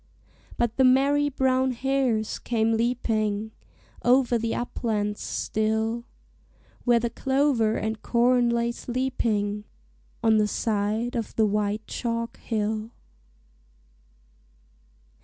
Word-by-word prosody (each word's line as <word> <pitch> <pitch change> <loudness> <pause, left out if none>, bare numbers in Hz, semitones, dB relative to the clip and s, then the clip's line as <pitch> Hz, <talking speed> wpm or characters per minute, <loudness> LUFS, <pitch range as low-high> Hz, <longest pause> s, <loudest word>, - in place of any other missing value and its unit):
But 235 -1 0
the 265 - +4
merry 280 +3 +4
brown 260 -1 +1
hares 250 -4 0
came 225 -1 0
leaping 220 -2 0 0.5
Over 245 -1 +3
the 225 0 -1
uplands 210 -4 -2
still, 220 +2 -1 0.8
Where 240 -1 +5
the 235 0 -2
clover 265 -5 +1
and 220 0 -3
corn 245 0 +3
lay 235 0 +1
sleeping 230 -5 -1 0.6
On 220 -1 +5
the 210 -1 +3
side 215 +3 -1
of 230 -3 -3
the 220 - +3
white 210 +1 -1
chalk 230 -1 -3
hill. 215 0 -2
230 Hz, 100 wpm, -26 LUFS, 215-250 Hz, 0.8 s, Where